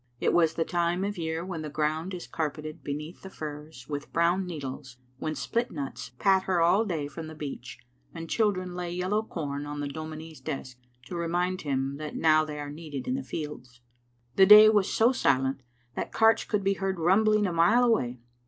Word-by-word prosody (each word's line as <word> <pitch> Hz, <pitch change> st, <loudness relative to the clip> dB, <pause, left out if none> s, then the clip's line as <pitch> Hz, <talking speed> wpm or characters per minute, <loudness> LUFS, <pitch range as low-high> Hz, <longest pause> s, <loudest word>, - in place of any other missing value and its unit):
It -, -, +1 dB
was 165 Hz, -2 st, +3 dB
the 165 Hz, -, 0 dB
time 175 Hz, +1 st, 0 dB
of 205 Hz, -2 st, -3 dB
year 160 Hz, +1 st, -2 dB
when 180 Hz, -4 st, -5 dB
the 155 Hz, -, -5 dB
ground 155 Hz, +4 st, -1 dB
is 175 Hz, -, -7 dB
car* 160 Hz, -2 st, -2 dB
peted 155 Hz, +1 st, -9 dB
beneath 150 Hz, +4 st, -6 dB
the 190 Hz, -, -9 dB
firs 150 Hz, -5 st, -8 dB
with 145 Hz, 0 st, -5 dB
brown 175 Hz, +3 st, +2 dB
needles, 135 Hz, -5 st, -7 dB, 0.2 s
when 155 Hz, 0 st, -3 dB
split 240 Hz, +1 st, -1 dB
nuts 140 Hz, -5 st, -6 dB
patter 190 Hz, -1 st, +2 dB
all 180 Hz, +7 st, +4 dB
day 160 Hz, -8 st, -2 dB
from 155 Hz, +3 st, -8 dB
the 155 Hz, -, -9 dB
beech, 150 Hz, -2 st, -7 dB, 0.3 s
and 165 Hz, -, -7 dB
children 185 Hz, -3 st, 0 dB
lay 175 Hz, -1 st, -4 dB
yellow 185 Hz, +4 st, 0 dB
com 145 Hz, -8 st, -5 dB
on 145 Hz, 0 st, -5 dB
the 145 Hz, -, -2 dB
dominie's 155 Hz, +2 st, -8 dB
desk 130 Hz, -2 st, -6 dB, 0.3 s
to 175 Hz, -, -7 dB
remind 175 Hz, +2 st, -1 dB
him 135 Hz, -1 st, -2 dB
that 150 Hz, 0 st, -6 dB
now 155 Hz, -1 st, +4 dB
they 150 Hz, -1 st, -6 dB
are 145 Hz, 0 st, -5 dB
needed 150 Hz, -3 st, -7 dB
in 255 Hz, -, 0 dB
the 270 Hz, -, -1 dB
fields. 130 Hz, -6 st, -7 dB, 0.6 s
The 190 Hz, -, +7 dB
day 210 Hz, +1 st, +10 dB
was 205 Hz, -3 st, +2 dB
so 230 Hz, +3 st, +4 dB
silent 135 Hz, -, +1 dB, 0.3 s
that -, -, -4 dB
carts 225 Hz, 0 st, +4 dB
could 210 Hz, -2 st, -1 dB
be 195 Hz, 0 st, +2 dB
heard 195 Hz, -1 st, -2 dB
rumbling 210 Hz, +5 st, +3 dB
a 180 Hz, -, -1 dB
mile 210 Hz, +9 st, +4 dB
away. 125 Hz, -, +1 dB
165 Hz, 200 wpm, -28 LUFS, 150-190 Hz, 0.6 s, day